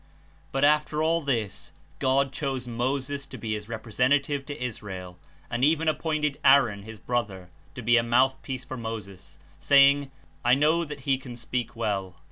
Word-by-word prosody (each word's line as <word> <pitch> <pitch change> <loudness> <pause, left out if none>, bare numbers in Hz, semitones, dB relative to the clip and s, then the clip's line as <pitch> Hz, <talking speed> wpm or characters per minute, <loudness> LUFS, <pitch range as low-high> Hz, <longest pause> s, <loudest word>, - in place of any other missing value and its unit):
But, 135 - 0
after 150 +1 +3
all 165 +1 +2
this, 120 -9 -2 0.3
God 135 +1 +2
chose 135 -4 -3
Moses 135 +4 -2
to - - -9
be 110 -2 -3
his 105 0 -6
rep 110 -1 -5
resentative 140 +4 +1
to 145 -3 -6
Israel, 95 -7 -6 0.3
and 120 +2 -2
even 160 +2 +3
appointed 155 -2 0
Aaron 125 -7 +5
his 110 +2 -10
brother 100 -7 -3 0.3
to 125 - -7
be 120 +2 +5
a - - +5
mouthpiece 130 +2 +1
for 130 -1 -6
Moses, 110 -5 -7 0.2
saying, 140 0 +5 0.3
''I 125 +2 +4
know 155 +4 +3
that 150 -2 -8
he 135 0 +1
can 125 -2 -9
speak 120 +1 -4
well." 100 -5 -2
130 Hz, 165 wpm, -26 LUFS, 115-140 Hz, 0.3 s, Aaron